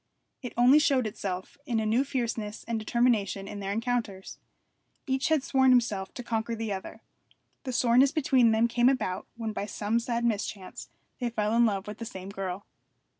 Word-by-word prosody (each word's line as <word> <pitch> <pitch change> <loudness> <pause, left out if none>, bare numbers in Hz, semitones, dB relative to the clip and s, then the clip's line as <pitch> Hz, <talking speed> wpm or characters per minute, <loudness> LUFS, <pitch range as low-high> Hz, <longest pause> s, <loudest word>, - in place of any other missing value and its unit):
It 250 - -6
only 250 +5 +7
showed 275 -5 +2
itself 190 0 -5
in 235 -4 +1
a 220 - -1
new 225 +5 +2
fierceness 230 -6 -3
and 230 -1 -1
determination 215 -4 +1
in 205 - -6
their 195 0 -3
encounters. 225 -3 -3 0.7
Each 265 -1 0
had 315 -4 +2
sworn 265 -1 +3
to - - +7
himself 205 -6 0
to 245 - -6
conquer 230 0 -2
the 225 -2 -3
other. 190 -1 -8 0.6
The 260 - -2
soreness 250 +2 +4
between 265 -6 +3
them 225 +1 +3
came 240 +1 +3
about 195 -8 -2
when 225 -2 -3
by 205 - -3
some 215 +2 -1
sad 235 0 -2
mischance 205 -4 -3 0.3
they 245 -2 -1
fell 215 -1 0
in 235 0 +5
love 195 -3 -2
with 210 +1 -8
the 230 - -5
same 190 -5 -8
girl. 195 -1 -5
230 Hz, 185 wpm, -28 LUFS, 205-245 Hz, 0.7 s, only